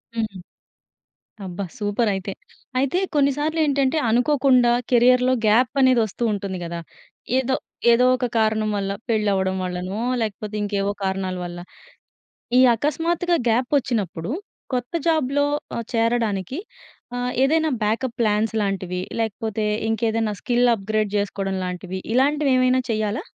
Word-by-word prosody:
హ్మ్. 220 Hz, -4 st, -2 dB, 1.1 s
అబ్బా! 185 Hz, +1 st, -5 dB
సూపర్ 210 Hz, +2 st, 0 dB
అయితే. 195 Hz, +1 st, -4 dB, 0.5 s
అయితే 275 Hz, +6 st, +1 dB, 0.2 s
కొన్ని 280 Hz, -1 st, +4 dB
సార్లు 310 Hz, +2 st, -1 dB
ఏంటంటే 275 Hz, 0 st, +1 dB
అనుకోకుండా 250 Hz, 0 st, +4 dB, 0.2 s
కెరియర్‌లో 250 Hz, +1 st, +5 dB
గ్యాప్ 230 Hz, +4 st, +4 dB
అనేది 260 Hz, -2 st, +5 dB
వస్తూ 220 Hz, +3 st, -5 dB
ఉంటుంది 195 Hz, -2 st, -4 dB
కదా! 170 Hz, 0 st, -5 dB, 0.6 s
ఏదో 265 Hz, 0 st, +1 dB, 0.4 s
ఏదో 240 Hz, +2 st, +5 dB
ఒక 250 Hz, 0 st, -2 dB
కారణం 215 Hz, -1 st, +2 dB
వల్ల 195 Hz, -1 st, -2 dB, 0.2 s
పెళ్లి 215 Hz, -2 st, +2 dB
అవ్వడం 190 Hz, -1 st, 0 dB
వల్లనో, 185 Hz, +3 st, -4 dB, 0.2 s
లేకపోతే 215 Hz, -1 st, -4 dB
ఇంకేవో 200 Hz, -1 st, -1 dB
కారణాల 190 Hz, -1 st, -1 dB
వల్ల. 175 Hz, 0 st, -7 dB, 1.0 s
ఈ -, -, +7 dB, 0.2 s
అకస్మాత్తుగా 330 Hz, +6 st, 0 dB
గ్యాప్ 245 Hz, +3 st, +1 dB
వచ్చినప్పుడు 205 Hz, -, -2 dB, 0.4 s
కొత్త 245 Hz, +2 st, -2 dB
జాబ్‌లో 285 Hz, -3 st, +2 dB, 0.3 s
ఆహ్, 235 Hz, -, -4 dB
చేరడానికి 230 Hz, -, 0 dB, 0.6 s
ఆహ్, 245 Hz, 0 st, -1 dB
ఏదైనా 315 Hz, +3 st, +2 dB
బ్యాకప్ 230 Hz, +3 st, -1 dB
ప్లాన్స్ 215 Hz, 0 st, +1 dB
లాంటివి? 185 Hz, -3 st, -2 dB, 0.2 s
లేకపోతే 220 Hz, 0 st, -2 dB, 0.2 s
ఇంకేదైనా 225 Hz, -1 st, 0 dB
స్కిల్ 245 Hz, 0 st, +2 dB
అప్‌గ్రేడ్ 215 Hz, 0 st, -1 dB
చేసుకోవడం 195 Hz, -1 st, -2 dB
లాంటివి 180 Hz, +1 st, -5 dB
ఇలాంటివి 285 Hz, +3 st, +2 dB
ఏమైనా 255 Hz, 0 st, +3 dB
చేయాలా? 215 Hz, 0 st, -1 dB
225 Hz, 125 wpm, -22 LUFS, 200-255 Hz, 1.1 s, ఈ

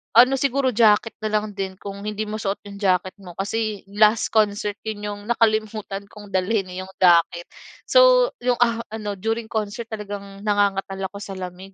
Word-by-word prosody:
ano 250 Hz, +3 st, +7 dB
siguro, 275 Hz, 0 st, +1 dB
jacket 220 Hz, -1 st, +3 dB
na 215 Hz, -, 0 dB
lang 210 Hz, -1 st, -7 dB
din 190 Hz, -1 st, -3 dB
kung 200 Hz, 0 st, -7 dB
hindi 210 Hz, 0 st, -3 dB
mo 215 Hz, +1 st, -4 dB
suot 195 Hz, 0 st, -3 dB
'yong 200 Hz, 0 st, -10 dB
jacket 185 Hz, -1 st, +1 dB
mo. 180 Hz, -3 st, -11 dB
Kasi 215 Hz, +1 st, -2 dB
last 215 Hz, +1 st, +3 dB
concert 205 Hz, -1 st, +1 dB
'yon 210 Hz, -1 st, -4 dB
'yong 205 Hz, 0 st, -5 dB
nakalimutan 215 Hz, -3 st, 0 dB
kong 205 Hz, 0 st, -13 dB
dalhin 190 Hz, +1 st, +1 dB
eh 180 Hz, -, -6 dB
'yong 190 Hz, 0 st, -13 dB
jacket. 170 Hz, -1 st, +4 dB, 0.4 s
So -, -, +6 dB
'yong, 245 Hz, -1 st, +1 dB
ah, 230 Hz, -1 st, 0 dB
ano, 210 Hz, -2 st, -4 dB
during 225 Hz, +2 st, -2 dB
concert 220 Hz, +2 st, -3 dB
talagang 200 Hz, -2 st, -7 dB
nangangatal 195 Hz, -1 st, +1 dB
ako 200 Hz, -, -9 dB
sa 195 Hz, -, -7 dB
lamig 185 Hz, +1 st, -8 dB
205 Hz, 180 wpm, -23 LUFS, 195-220 Hz, 0.4 s, ano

